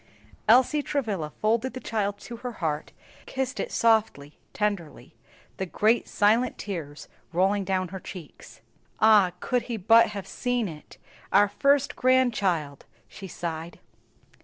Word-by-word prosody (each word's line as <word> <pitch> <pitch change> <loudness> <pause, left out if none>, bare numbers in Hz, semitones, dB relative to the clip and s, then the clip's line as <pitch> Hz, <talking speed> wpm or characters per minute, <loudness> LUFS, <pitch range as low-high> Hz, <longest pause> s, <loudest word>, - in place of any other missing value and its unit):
Elsie 260 +6 +5
Travilla 215 - -2
folded 230 - -1
the - - -4
child 205 -4 -2
to 235 - -8
her 245 +1 -6
heart, 155 -6 -3 0.4
kissed 265 0 -3
it - - -3
softly, 215 -11 +1
tenderly, 200 -7 -3 0.4
the 190 - -3
great 220 +6 +1
silent 225 +4 +2
tears 160 -8 -6 0.2
rolling 195 +3 +1
down 185 -1 -1
her 190 +1 -7
cheeks. 180 -4 -11 0.4
"Ah, 210 -4 +5
could 250 -1 0
he 235 - -2
but 225 +4 +5
have 200 -2 -6
seen 245 -3 -2
it! 155 -3 -11 0.3
our 205 +2 +5
first 275 +7 +1
grandchild," 205 - +1 0.2
she 195 - -10
sighed. 165 -1 -6
205 Hz, 135 wpm, -26 LUFS, 180-235 Hz, 0.4 s, Elsie